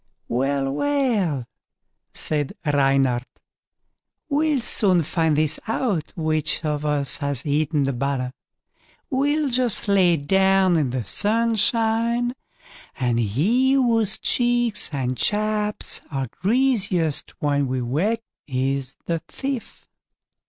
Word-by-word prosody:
"Well, 135 +2 0
well", 210 - 0 0.7
said 150 -3 -1
Reynard, 135 -4 +2 1.1
"we'll 300 -1 +1
soon 190 -7 +3
find 160 -1 0
this 155 0 +1
out, 215 - -1
which 155 -1 -1
of 150 0 -2
us 145 -2 0
has 140 -2 -2
eaten 150 0 +1
the 135 0 -1
butter. 130 0 -2 0.8
We'll 290 +2 +1
just 245 -4 +1
lay 185 -4 +4
down 190 +4 +3
in 150 -5 +1
the 125 -1 -3
sunshine, 230 - +1 0.7
and 120 -2 +1
he 195 - +2
whose 230 -6 +3
cheeks 240 -5 +1
and 130 -3 -2
chaps 210 - 0
are 135 -4 -3
greasiest 200 - 0
when 145 -2 0
we 130 0 -2
wake, 190 - -1 0.2
he 135 0 0
is 135 -1 -8
the 165 -1 -1
thief." 270 -4 -6
165 Hz, 110 wpm, -22 LUFS, 140-230 Hz, 1.1 s, lay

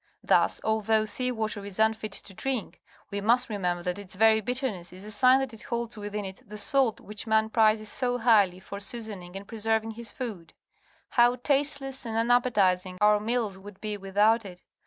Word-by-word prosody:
Thus, - - +3
although 220 0 +2
sea 250 +4 0
water 220 -3 -3
is 200 -2 -7
unfit 220 -1 +1
to 195 - -5
drink, 255 0 -4 0.3
we 200 0 -3
must 235 +4 +3
remember 180 -4 -2
that 180 +2 -2
its 195 -2 -8
very 220 +2 +5
bitterness 245 -7 -3
is 185 +2 -12
a 215 - -8
sign 255 +5 +5
that 265 -3 -4
it 225 - -7
holds 235 -2 -3
within 205 -1 -5
it 190 0 -8
the 210 +1 -10
salt 245 +2 +2
which 210 +2 -8
man 220 0 +2
prizes 215 -1 +3
so 245 -1 -1
highly 210 -6 +4
for 200 +1 -8
seasoning 205 -4 -5
and 195 +1 -7
preserving 225 0 -1
his 230 +1 -6
food. 205 -11 -7 0.5
How 240 0 +4
tasteless 270 0 -1
and 225 -2 -3
unappetizing 205 -6 +2
our 210 0 +5
meals 215 -3 -2
would 195 0 -12
be 215 -1 -3
without 205 +3 +2
it! 180 -2 -11
220 Hz, 185 wpm, -27 LUFS, 200-235 Hz, 0.5 s, very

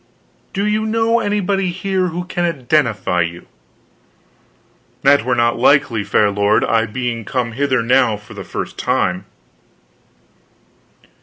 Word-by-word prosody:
"Do 200 +1 -2
you 215 +1 0
know 225 +1 +2
anybody 200 -2 0
here 185 +1 -1
who 175 +1 -4
can 175 -1 -3
identify 125 - 0
you?" 85 +1 -4 1.6
"That 140 -3 +5
were 125 +1 0
not 120 0 +1
likely, 130 -4 +3
fair 105 +1 +2
lord, 105 +2 +2
I 115 0 +1
being 120 0 -3
come 120 +2 -2
hither 130 0 0
now 125 -2 +3
for 105 +1 -14
the - - -8
first - - -6
time." 90 +1 0
130 Hz, 130 wpm, -18 LUFS, 110-180 Hz, 1.6 s, That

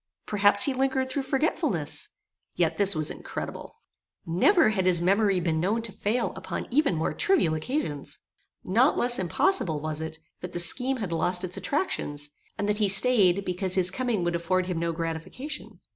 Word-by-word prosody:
Perhaps 205 -1 +4
he 275 - 0
lingered 265 0 -1
through 280 - -1
forgetfulness. 270 +4 -1 0.5
Yet - - 0
this 200 -2 +3
was 155 -1 +2
incredible. - - -7 0.5
Never 265 - +3
had 190 -4 0
his 175 -2 +4
memory 195 +2 +2
been 165 -2 -1
known 210 +7 0
to 225 - -1
fail 220 +5 -2
upon - - -5
even 270 - +2
more 160 - -1
trivial 380 - +2
occasions. 155 - -3 0.5
Not 235 +10 +2
less 245 0 +4
impossible 175 - +1
was 155 +1 -4
it, 160 0 -6 0.2
that 180 0 -8
the 175 - -3
scheme 250 +10 +2
had 200 -7 -5
lost 180 +2 0
its 185 0 -3
attractions, 145 - -3 0.3
and 205 - -2
that 210 0 0
he 205 -2 +3
staid, 195 -2 +5
because 185 +1 -1
his 185 -1 +4
coming 240 -5 -1
would 175 0 -1
afford 180 +2 0
him 180 -2 -3
no 170 0 -1
gratification. 165 - -6
190 Hz, 175 wpm, -26 LUFS, 170-250 Hz, 0.5 s, staid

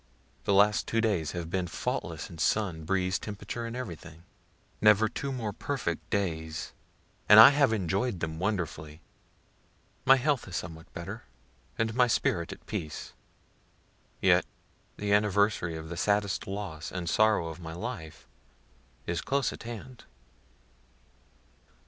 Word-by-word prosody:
The 100 - +2
last 105 +1 +4
two 115 - +1
days 100 -10 0
have 85 -2 -5
been 95 -1 -1
faultless - - -3
in 85 - -12
sun, 85 -5 0
breeze, 95 0 0
temperature 105 +3 -5
and 115 - -6
everything; 85 -9 -8 0.6
never 105 +1 +6
two 140 +5 -4
more 115 -6 -3
perfect 95 - -3
days, 80 -6 -2 0.6
and 105 - +10
I 115 - +12
have 140 -4 +3
enjoy'd 100 +1 -1
them 80 0 -4
wonderfully. 80 -6 -3 1.0
My 135 - +7
health 135 -2 0
is 90 - -7
somewhat 80 0 -6
better, 100 +7 -7 0.5
and 115 0 0
my 125 +1 +4
spirit 85 -7 0
at - - -11
peace. 75 -2 -5 1.1
(Yet - - +4 0.5
the 100 0 0
anniversary 100 -4 +2
of 80 0 -8
the 85 - -6
saddest 100 +1 0
loss 95 -5 -5
and 90 -2 -4
sorrow 105 -2 +3
of 80 +1 -8
my 80 -2 -7
life 85 -5 -7 0.8
is 85 0 -2
close 140 -2 0
at - - -10
hand.) 120 +2 -9
100 Hz, 135 wpm, -29 LUFS, 85-110 Hz, 1.1 s, I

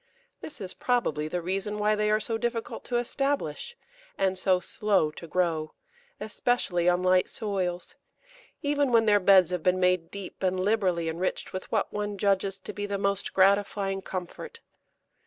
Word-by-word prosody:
This 300 - -7
is 190 -3 -5
probably 195 - 0
the 175 +2 -3
reason 195 +4 -2
why 210 0 +2
they 210 0 +1
are 215 0 +3
so 225 0 -2
difficult 235 -1 -3
to 240 - -1
establish, 275 - -2 0.4
and 190 -1 +1
so 185 0 +2
slow 195 -5 +1
to 170 - -10
grow, 160 -3 -1 0.4
especially 205 -6 0
on 180 +1 +1
light 185 0 +3
soils, 185 -5 -3 0.7
even 285 -2 +1
when 230 -1 +5
their 205 -1 +5
beds 185 -2 +5
have 180 -2 -1
been 180 +2 +2
made 180 -2 +2
deep 200 -2 -8
and 185 -1 0
liberally 185 -4 +1
enriched 170 +3 -3
with 185 - -6
what 215 -3 0
one 205 -1 -3
judges 195 -1 +1
to 190 - -8
be 205 0 -4
the 200 0 -2
most 200 0 -1
gratifying 195 0 +2
comfort. 185 -2 -7
195 Hz, 165 wpm, -27 LUFS, 180-210 Hz, 0.7 s, when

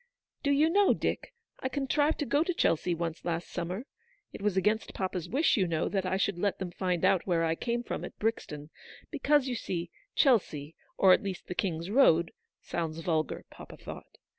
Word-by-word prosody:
Do 285 - 0
you 285 +2 +4
know, 400 +2 +4
Dick, - - -2 0.3
I 260 - -2
contrived 290 +3 +1
to - - +1
go 285 +5 +2
to 360 0 -2
Chelsea 170 - +1
once 165 -1 -4
last 170 0 -2
summer. 180 +7 -4 0.5
It - - -8
was 200 -2 0
against 210 +4 +1
papa's 185 -3 -3
wish, 285 +1 +3
you 190 -3 +2
know, 165 -1 0
that 190 -2 -1
I 190 +1 +1
should 195 -2 0
let 200 +1 0
them 185 -2 -5
find 180 -1 0
out 190 -1 +3
where 170 -2 +2
I 160 - +1
came 235 +7 -2
from - - -4
at - - -8
Brixton; 155 -9 -3 0.4
because, 290 -2 +2
you 255 - -1
see, 175 -7 -4 0.2
Chelsea, 165 - +2 0.2
or 190 -1 +7
at - - +3
least 195 -3 -5
the - - -5
King's 175 -1 -2
Road, 170 -10 +5 0.3
sounds 165 -2 -3
vulgar, 160 -2 -1
papa - - -11
thought. - - -10
190 Hz, 195 wpm, -30 LUFS, 170-245 Hz, 0.5 s, or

